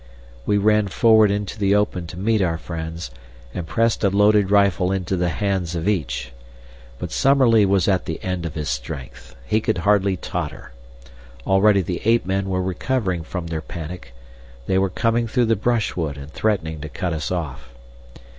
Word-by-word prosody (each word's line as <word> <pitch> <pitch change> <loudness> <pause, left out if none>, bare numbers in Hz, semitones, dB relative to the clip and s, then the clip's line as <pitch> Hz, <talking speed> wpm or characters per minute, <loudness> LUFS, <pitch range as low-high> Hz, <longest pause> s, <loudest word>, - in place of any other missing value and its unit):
We 105 - +3
ran 105 0 +3
forward 110 +1 +5
into 100 +1 -3
the 100 0 +3
open 95 -4 0
to 85 - -9
meet 110 +2 +1
our 85 -3 0
friends, 80 -4 -6 0.4
and 85 -2 -5
pressed 115 +3 +1
a 100 - +4
loaded 105 0 +4
rifle 100 -2 +3
into 95 -1 -1
the 90 -1 0
hands 90 0 -1
of 85 +2 -3
each. 80 -11 -1 0.7
But - - -6
Summerlee 130 -6 +4
was 95 -2 +2
at 95 -3 +1
the 80 - -4
end 90 -2 -2
of 80 - -9
his 75 -2 -3
strength. - - -6
He 110 - +1
could 110 -2 0
hardly 100 +1 +2
totter. - - -5 0.7
Already 100 0 +4
the 90 0 -4
ape 115 +2 +3
men 95 +1 -1
were 95 -1 0
recovering 95 0 -1
from 85 +2 -5
their 80 -1 -4
panic. 80 -6 -8 0.5
They 95 +6 +2
were 95 0 +1
coming 115 +5 0
through 120 +2 +1
the 115 0 +2
brushwood 100 -9 -1
and 70 +2 -9
threatening 80 -8 -1
to 80 - -6
cut 90 +3 -3
us 80 0 -3
off. 75 -9 -4
95 Hz, 175 wpm, -22 LUFS, 85-105 Hz, 0.7 s, forward